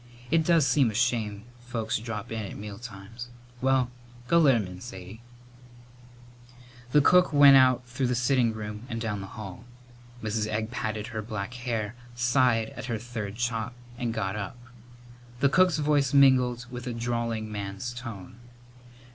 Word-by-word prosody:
It 165 0 +4
does 165 -3 +4
seem 140 -4 +3
a 105 - -6
shame 110 -4 0 0.2
folks 120 -3 -3
drop 110 -2 -6
in 110 -1 -3
at 100 - -7
mealtimes. 105 +2 -8 0.3
Well, 130 -1 +2 0.4
go 170 - +5
let 140 -6 +6
him 110 -4 0
in 90 0 -9
Sadie." 95 0 -9 1.7
The 150 - +6
cook 180 +5 +5
went 145 -2 +8
out 130 -1 +5
through 125 +1 -2
the 125 - 0
sitting 125 -1 +2
room 105 -1 -6
and 115 -2 -3
down 105 -3 -3
the 95 - -7
hall. 100 0 -9 0.6
Mrs. 110 0 -1
Egg 110 +1 -2
patted 110 -3 -3
her 110 - -2
black 105 +1 -5
hair, 120 -3 -3 0.2
sighed 120 -2 +2
at - - -7
her 120 -3 -2
third 110 -3 -6
chop 120 0 -2 0.2
and 120 -1 -2
got 105 -3 -2
up. 105 +3 -5 0.8
The 140 - +4
cook's 180 +2 +4
voice 145 -2 +2
mingled 125 -3 +5
with 125 0 -6
a 125 - -2
drawling 115 -2 -2
man's 100 +3 -5
tone. 115 -2 -8
115 Hz, 160 wpm, -27 LUFS, 105-125 Hz, 1.7 s, went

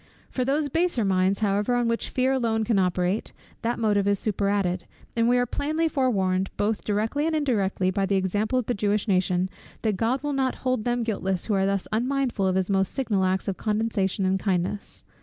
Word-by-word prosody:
For 255 - -1
those 285 +3 +1
baser 325 - +1
minds 190 +1 +2
however 205 +3 +1
on 240 -1 +1
which 230 0 -1
fear 255 +1 +1
alone 230 -4 +1
can 215 -2 +2
operate, 180 +2 0 0.3
that 235 +1 -1
motive 205 -3 +1
is 200 0 +3
superadded: 200 -3 0 0.3
and 230 0 +3
we 250 - +4
are 245 - +2
plainly 310 +6 -1
forewarned, 195 -10 +1
both 210 +1 0
directly 220 +9 0
and 325 - 0
indirectly, 200 -10 +1
by 195 0 0
the 200 - +1
example 205 +6 0
of 250 - 0
the 245 - 0
Jewish 205 +1 0
nation, 185 -2 +2 0.4
that 215 -4 +1
God 245 +6 0
will 290 -1 -1
not 265 -1 0
hold 255 -4 0
them 240 0 0
guiltless 195 -5 -1
who 215 - 0
are 195 -1 +2
thus 195 -1 -1
unmindful 245 -3 0
of 185 - +1
his 190 -1 +1
most 195 -1 +1
signal 215 -8 0
acts 185 +1 0
of 195 - -2
condescension 210 -3 0
and 190 +1 +1
kindness. 190 +1 -2
210 Hz, 200 wpm, -25 LUFS, 190-245 Hz, 0.4 s, we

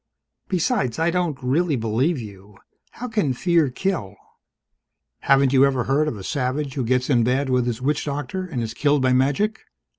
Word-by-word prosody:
Besides, 180 - 0
I 165 +1 +1
don't 175 -5 -1
really 150 +5 +1
believe 120 +8 0
you. 100 -3 -11 0.4
How 250 - -6
can 210 - 0
fear 165 +1 +2
kill?" 125 - -3 1.0
"Haven't 135 -1 +3
you 135 0 +6
ever 135 -3 +2
heard 140 +5 +1
of 125 - -3
a 95 - -8
savage 135 +2 -2
who 135 -3 -2
gets 125 +2 +1
in 125 -5 +3
bad 130 +3 0
with 125 -1 +1
his 120 +1 -3
witch 145 +2 0
doctor 145 +5 -3
and 145 -10 -4
is 110 - -5
killed 145 -2 +1
by 130 0 +3
magic? 140 +12 +1
135 Hz, 180 wpm, -22 LUFS, 125-160 Hz, 1.0 s, you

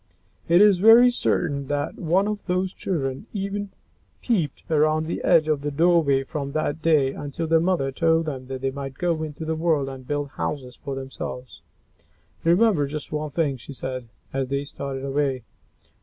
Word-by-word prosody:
It 170 +3 +5
is 205 -3 +6
very 230 +5 +8
certain 140 - 0
that 145 +1 -2
not - - -10
one 185 +5 +2
of 210 -2 -4
those 185 +1 0
children 135 - -3
even 200 0 -3 0.5
peeped 175 - 0
around 155 0 +3
the 165 - -4
edge 165 -3 +4
of 150 -2 +1
the 145 - -2
doorway 155 -3 +3
from 140 0 -5
that 155 0 -1
day 150 -5 +3
until 145 +3 -4
their 165 0 +4
mother 170 -6 +1
told 165 +3 +2
them 130 -4 -5
that 130 -1 -5
they 135 0 0
might 135 0 -6
go 170 0 -1
into 155 0 -5
the 160 - -1
world 160 -4 +1
and 130 -1 -9
build 145 -1 -2
houses 130 -3 -4
for 135 +2 -6
themselves. 130 -1 -7 0.8
"Remember 175 -3 +3
just 150 +1 -6
one 155 0 -2
thing," 145 -3 0
she 125 +3 -10
said, 130 -2 -5 0.2
as 135 -1 -1
they 140 +1 -1
started 140 -1 -5
away. 135 -2 -1
150 Hz, 180 wpm, -24 LUFS, 135-170 Hz, 0.8 s, very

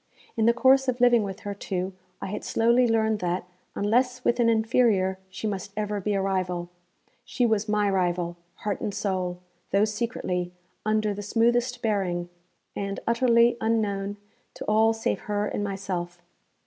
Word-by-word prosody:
In 225 -1 +2
the - - +7
course 265 +2 +4
of 250 -1 0
living 240 -1 +5
with 200 0 -5
her, 205 -1 -4
too, 190 -1 -3 0.3
I - - -2
had 195 - -5
slowly 235 +2 +3
learned 220 -1 +2
that, 180 0 -1 0.3
unless 250 +4 +1
with 240 +1 +2
an 235 -1 +4
inferior, 220 -4 +2
she 190 - -7
must 200 -1 -3
ever 210 -1 -2
be 205 +1 0
a 195 - +1
rival. 180 -2 -2 0.5
She 250 - 0
was 220 -2 +1
my 210 -1 +2
rival, 175 -3 0 0.2
heart 205 -2 -3
and 205 - -3
soul, 185 -3 -2 0.3
though 200 +2 +3
secretly, 205 -5 -2 0.3
under 215 -1 +1
the 205 - -6
smoothest 240 +3 +1
bearing, 185 -5 0 0.5
and 200 0 -3
utterly 235 0 +4
unknown 205 -3 0 0.4
to - - -7
all 220 +1 +4
save 225 - -1
her 205 0 0
and 205 - -2
myself. 185 -3 -4
210 Hz, 160 wpm, -26 LUFS, 190-230 Hz, 0.5 s, the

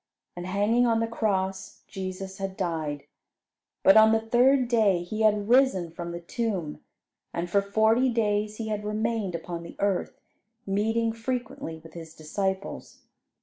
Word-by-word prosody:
And 175 0 -6
hanging 210 +6 +2
on 225 -1 +2
the 230 - +1
cross, 195 -4 -2
Jesus 190 0 -6
had 195 -1 -4
died. 160 -6 -2 0.8
But 195 - +7
on 220 0 +7
the 225 - +4
third 245 +3 +3
day 210 -7 +3
He 215 +5 -4
had 210 -1 +3
risen 235 -9 +3
from 170 +1 -6
the 170 - -5
tomb, 180 -4 -3 0.5
and 170 +1 -2
for 200 - +4
forty 220 +5 +3
days 210 -2 0
He 220 -1 -4
had 210 -1 -2
remained 210 -3 -1
upon 170 0 -5
the 170 - -10
earth, 200 -2 -1 0.5
meeting 225 +3 0
frequently 230 -8 -4
with 165 -1 -14
His 165 -1 -10
disciples. 190 +5 -4
205 Hz, 150 wpm, -27 LUFS, 180-225 Hz, 0.8 s, But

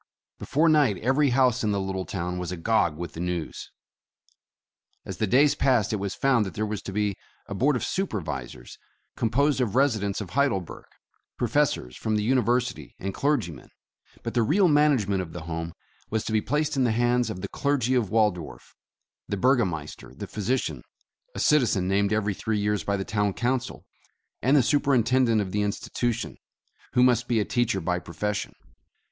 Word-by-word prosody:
Be - - -8
fore 155 +4 +3
night 145 - +4
every 135 +6 +2
house 125 -1 +2
in 110 - +1
the 100 - 0
little 95 -1 -3
town 90 -1 -3
was 90 -1 -4
agog 90 -3 +1
with 85 -2 -6
the - - -8
news. 90 -2 -4 1.4
As - - -6
the 110 - 0
days 140 +7 +4
passed, 125 -4 +2
it - - +1
was 100 -1 -4
found 130 -5 +3
that 95 -5 -6
there 110 - -1
was 105 -1 -4
to 100 - -7
be 105 0 0 0.3
a - - -6
Board 130 +8 +2
of 125 - -2
Supervisors 80 - -4 0.4
composed 135 +5 +1
of 115 -3 -1
residents 110 -8 +1
of 100 -5 -6
Heid 140 +1 +3
elberg, 95 -6 -5 0.3
— - - -48
professors - - 0
from 110 -1 -2
the 105 - 0
University 125 0 0
and 95 +1 -4
clergy 135 - 0
men, - - -13 0.3
— - - -29
but - - -4
the 120 - +2
real 180 - +3
management 140 - +3
of 80 -3 -8
the 90 - -6
Home 80 0 -4 0.4
was 110 0 -1
to - - -3
be 110 - +3
placed 150 +5 -1
in 135 - +2
the 120 -3 +2
hands 120 +1 +2
of 90 - -5
the - - -5
clergy 135 -3 0
of 120 -6 +1
Waldorf, 105 -7 -1 0.5
the 100 - -2
burgomaster, 95 - 0
the - - -6
physician, 115 +5 -2 0.5
a - - -4
citizen 115 -11 +3
named 100 +1 +1
every 105 -1 +1
three 110 +3 -2
years 105 0 0
by 100 0 0
the 95 - -4
Town 105 -2 0
Council, 125 +3 -2 0.6
and 135 +5 +4
the 135 - +5
Superin 135 -3 +2
tendent 120 -3 +3
of 95 -2 -4
the 105 - 0
institution, 115 +3 -2 0.6
who 125 - +4
must 120 -1 +3
be 115 -2 +2
a 105 - 0
teacher 120 -5 0
by 90 0 -1
profession. 95 +5 -4
110 Hz, 190 wpm, -26 LUFS, 95-130 Hz, 1.4 s, the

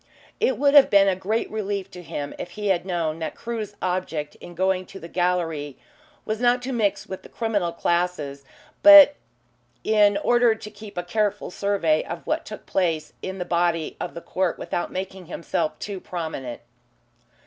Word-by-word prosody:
It 475 +3 +2
would 285 0 +3
have 285 -2 +8
been 200 -1 +6
a 190 - +3
great 210 +5 -1
relief 200 -2 -3
to 180 - -9
him 145 -3 -5
if - - -5
he 210 -1 -1
had 185 -1 +1
known 165 -3 -1
that 160 - -4
Crewe's 220 -3 -5
object 180 -5 -2
in 175 - -10
going 185 0 0
to 195 - -10
the 170 - -9
gallery 165 -5 -1 0.5
was 215 0 -2
not 245 0 +3
to 260 +1 -3
mix 215 -5 0
with 190 - -7
the - - -14
criminal 205 -7 -1
classes, 170 -5 -1 0.4
but 300 -1 +10 0.7
in 210 -2 +4
order 240 +2 +3
to 215 -1 -10
keep 205 -2 -12
a 175 - -1
careful 205 +2 -1
survey 180 -6 +1
of 170 0 -7
what 320 +1 -2
took 210 - -9
place 160 -5 -1
in 190 0 -5
the 180 - -3
body 170 -2 0
of - - -5
the 170 - -6
court 185 0 -1
without 175 - -3
making 190 -1 -6
himself 165 -2 -2
too 200 -2 -5
prominent. 160 -10 -5
185 Hz, 180 wpm, -24 LUFS, 170-210 Hz, 0.7 s, but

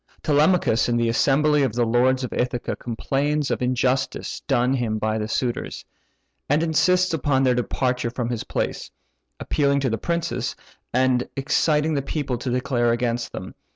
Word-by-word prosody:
Telemachus 150 -6 +3
in 120 - +1
the 115 -1 +1
assembly 145 +5 +3
of 130 -6 +1
the 120 0 +1
lords 125 +3 +2
of 125 - -4
Ithaca 125 -1 -2
complains 140 +5 -1
of - - 0
the 125 - 0
injustice 130 +1 -1
done 125 +2 +2
him 120 -4 -1
by 110 0 -1
the 105 - -2
suitors, 120 +2 -3 0.6
and 150 +3 +3
insists 180 +3 +2
upon 140 -3 +1
their 130 -1 +4
departure 125 0 -1
from 120 0 -3
his 120 -3 -3
palace; - - -3 0.5
appealing 140 -2 +1
to 130 -3 0
the 115 - -2
princes, 170 0 -2 0.4
and 125 0 +1
exciting 150 +2 +1
the 140 - 0
people 140 -3 -3
to 125 - -4
declare 125 -1 +1
against 120 0 -1
them. 95 - -7
130 Hz, 165 wpm, -23 LUFS, 120-145 Hz, 0.6 s, their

